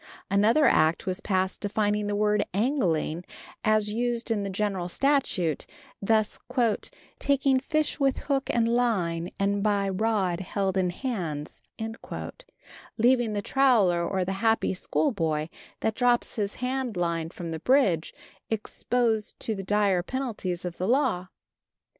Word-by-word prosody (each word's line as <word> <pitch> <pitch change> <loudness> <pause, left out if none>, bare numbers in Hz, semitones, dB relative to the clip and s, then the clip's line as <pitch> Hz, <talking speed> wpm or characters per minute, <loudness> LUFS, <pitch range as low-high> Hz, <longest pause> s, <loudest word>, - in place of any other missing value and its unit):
Another 220 +9 +4
act 160 -8 +3
was 185 +2 -2
passed 190 -1 0
defining 205 0 0
the 205 - -1
word 210 0 +2
"angling," 185 - 0 0.4
as 215 -1 +2
used 235 0 -1
in 215 -2 +1
the 200 - -3
general 190 -2 -2
statute, 195 - +1 0.3
thus 215 +1 +1 0.8
"taking 275 -1 +2
fish 305 +3 -1
with 275 -2 +2
hook 275 -2 0
and 230 -1 +2
line 190 -9 +1
and 200 0 +1
by 200 -1 +1
rod 195 -3 0
held 195 0 -2
in 185 -1 +2
hands," 175 - -4 1.4
leaving 240 -1 +3
the 205 -1 -2
troller 215 -12 +3
or 185 +1 -1
the 190 - -2
happy 225 -3 +2
schoolboy, 165 - 0 0.3
that 220 - +1
drops 245 0 +2
his 205 -2 -2
hand 250 -4 -2
line 170 -2 -1
from 170 -1 -7
the 160 - -4
bridge, 195 - +2 0.4
exposed 225 0 -1
to 225 - -1
the 195 - -4
dire 200 -2 +2
penalties 200 -6 -3
of 175 -1 -5
the 185 - -1
law. 240 -8 +1
210 Hz, 135 wpm, -27 LUFS, 180-240 Hz, 1.4 s, Another